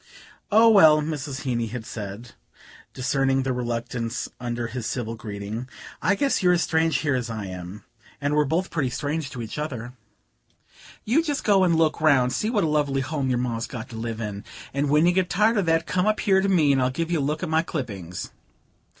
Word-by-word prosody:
"Oh, 220 +2 +6
well," 160 -9 +7
Mrs. 150 -3 -4
Heeny 120 -4 -1
had 120 0 -6
said, 105 +2 -7 0.6
discerning 135 0 +1
the 130 -1 -1
reluctance 120 -1 -3
under 120 -1 -3
his 115 0 -4
civil 115 -3 -3
greeting, 110 +2 -6 0.3
"I 195 +4 +3
guess 275 +6 +1
you're 180 -1 +4
as 175 - +2
strange 160 0 +2
here 145 -3 +1
as 125 -2 -2
I 110 -3 -4
am, 90 +2 -8 0.4
and 145 0 -1
we're 150 0 +3
both 165 +6 -1
pretty 145 -6 0
strange 150 +3 -3
to 125 -2 -6
each 110 +6 -6
other. 125 -5 -5 1.1
You 255 +9 +3
just 295 -4 -2
go 195 -3 +4
and 175 -2 +3
look 160 -1 +2
round, 145 -5 +5
and 125 +1 -1
see 215 - 0
what 220 -5 +1
a - - +2
lovely 145 -3 +1
home 135 0 -2
your 125 - +1
Ma's 120 -2 -2
got 125 0 -7
to 115 - -9
live 115 0 -4
in; 105 -2 -5 0.3
and 140 +1 0
when 150 +3 +4
you 175 - +5
get 180 0 +1
tired 215 +4 +3
of 195 -4 +1
that, 165 0 +2
come 180 +2 0
up 215 - +1
here 190 -1 +3
to 195 - 0
me 160 -7 +4
and 135 -1 +2
I'll 125 - +2
give 165 +6 -3
you 170 - +1
a - - 0
look 150 +5 -2
at 180 - -2
my 160 0 +3
clippings." 100 - -5
140 Hz, 220 wpm, -24 LUFS, 120-165 Hz, 1.1 s, well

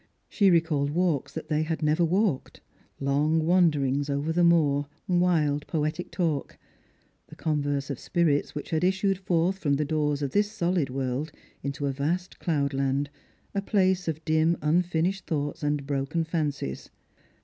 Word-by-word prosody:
She 200 -3 +3
recalled 160 -5 +2
walks 165 -3 0
that 160 - -6
they 155 -1 +1
had 160 0 -2
never 155 +3 +3
walked, 180 -3 0 0.4
long 150 +4 +1
wanderings 145 -6 +2
over 145 +3 -1
the 175 +1 +3
moor; 145 -4 +3 0.2
wild 170 -5 +2
poetic 155 +2 -2
talk; 160 -6 -2 0.7
the - - -13
converse 145 -2 -1
of 135 - -5
spirits 160 -6 0
which 150 - -6
had 160 +1 +1
issued 190 +1 +1
forth 185 0 +1
from 145 -6 +1
the 150 +2 0
doors 150 -1 0
of 140 - -2
this 205 0 +1
solid 175 -7 0
world 135 +3 -2 0.3
into 140 +1 -3
a 140 - +1
vast 170 +7 -2
cloudland, 140 -3 0 0.4
a 200 - 0
place 190 -3 +1
of 160 0 -3
dim 160 +1 +2
unfinished 175 +4 0
thoughts 145 0 -2
and 145 -1 -1
broken 140 +4 -1
fancies. 150 - -3
155 Hz, 150 wpm, -27 LUFS, 145-175 Hz, 0.7 s, She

